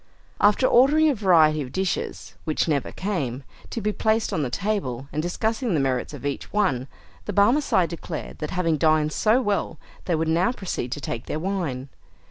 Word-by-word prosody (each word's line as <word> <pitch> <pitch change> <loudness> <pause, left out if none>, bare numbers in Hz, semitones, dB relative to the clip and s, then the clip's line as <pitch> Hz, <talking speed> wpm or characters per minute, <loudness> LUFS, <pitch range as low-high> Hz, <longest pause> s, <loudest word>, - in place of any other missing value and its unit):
After 210 +5 +4
ordering 295 +6 +5
a - - +3
variety 165 - +4
of 130 -2 -6
dishes 190 +3 -3
(which 155 +1 0
never 145 -5 0
came) 140 - -3 0.3
to 230 - -4
be 210 - 0
placed 220 +1 0
on 155 - 0
the 135 - -1
table, 135 - -2
and 150 - 0
discussing 220 - -1
the - - +2
merits 130 -2 -1
of 145 -2 -9
each 140 -1 -4
one, 145 -12 +1 0.4
the 205 - -4
Barmecide 200 - +3
declared 165 -1 -7
that 150 - -3
having 165 -4 0
dined 155 -1 +3
so 225 - +2
well, 205 -2 -1 0.3
they 175 - +1
would 160 +1 -1
now 170 +7 +2
proceed 180 - -4
to 145 - -6
take 115 -2 -5
their - - -2
wine. 155 -7 -3
170 Hz, 185 wpm, -24 LUFS, 145-210 Hz, 0.4 s, ordering